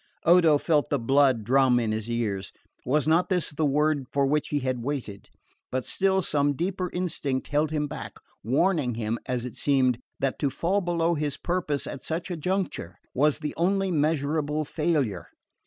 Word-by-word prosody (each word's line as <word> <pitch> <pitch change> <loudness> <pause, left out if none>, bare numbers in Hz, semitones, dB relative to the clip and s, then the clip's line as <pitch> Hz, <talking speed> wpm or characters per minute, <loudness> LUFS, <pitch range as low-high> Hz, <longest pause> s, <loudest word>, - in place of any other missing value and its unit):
Odo 165 -3 +6
felt 150 -1 +1
the 145 - +1
blood 130 -1 +3
drum 130 +1 +4
in 115 -2 -1
his 110 +1 -3
ears. 105 -5 -2 0.4
Was 150 +3 +2
not 165 +3 +3
this 180 -3 0
the 150 +1 0
word 145 -1 +1
for 140 -1 +2
which 150 +2 +1
he 145 - -1
had 130 -2 -2
waited? 120 -8 -5 0.4
But 130 -1 -2
still 190 -1 +1
some 145 -2 +2
deeper 180 +3 -2
instinct 155 -7 -2
held 150 +1 +1
him 150 -1 -1
back, - - -7 0.3
warning 135 - +1
him, 115 0 -2
as 125 -1 -2
it 125 - -6
seemed, 130 -4 +2 0.2
that 135 -1 -1
to 140 - +1
fall 180 +9 0
below 170 -1 +1
his 150 -3 -2
purpose 170 -5 -1
at 140 - -6
such 170 +3 -4
a - - -1
juncture 170 - -3 0.2
was 150 +2 +2
the 150 -1 -4
only 195 +2 +1
measurable 150 -1 0
failure. 145 - -1
145 Hz, 175 wpm, -26 LUFS, 130-165 Hz, 0.4 s, Odo